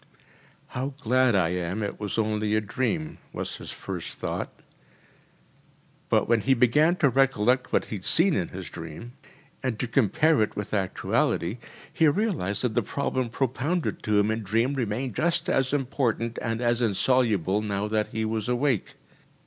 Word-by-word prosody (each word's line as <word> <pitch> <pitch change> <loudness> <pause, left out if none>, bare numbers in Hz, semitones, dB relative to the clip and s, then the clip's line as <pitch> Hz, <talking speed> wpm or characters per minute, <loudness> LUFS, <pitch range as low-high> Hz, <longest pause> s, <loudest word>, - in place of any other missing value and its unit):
“How 135 +2 -4
glad 130 -2 +3
I 90 -4 +3
am 90 +3 -2
that 100 - 0
it - - -18
was 105 +1 -3
only 110 -1 +1
a - - +4
dream,‚ÄĚ 135 - -2 0.2
was - - -4
his - - -9
first - - -5
thought. - - -3 1.6
But - - +3
when 115 -1 +3
he 135 +4 +3
began 150 +8 +4
to 145 -6 +3
recollect 130 -1 +2
what - - +2
he 105 - -5
had 95 - -9
seen 175 +3 +4
in 90 -3 0
his 95 -1 -8
dream, 85 +9 -8 0.5
and 130 -4 -2
to 125 - -1
compare 140 +6 +3
it 110 - 0
with 105 0 -5
actuality, 95 0 0 0.3
he 165 -2 +4
realised 145 - 0
that 125 -3 0
the - - +2
problem 130 -3 -2
propounded 135 +8 -1
to 105 -1 +1
him 105 +1 +2
in 110 +1 -2
dream 115 +6 +1
remained 125 -1 -2
just 170 +4 0
as 130 -1 +1
important 125 -4 -1
and 115 0 -2
as 120 0 +1
insoluble 105 -3 +2
now 105 -1 -2
that 105 0 0
he 110 0 -3
was 110 0 -2
awake. 125 -3 0
115 Hz, 170 wpm, -26 LUFS, 105-135 Hz, 1.6 s, a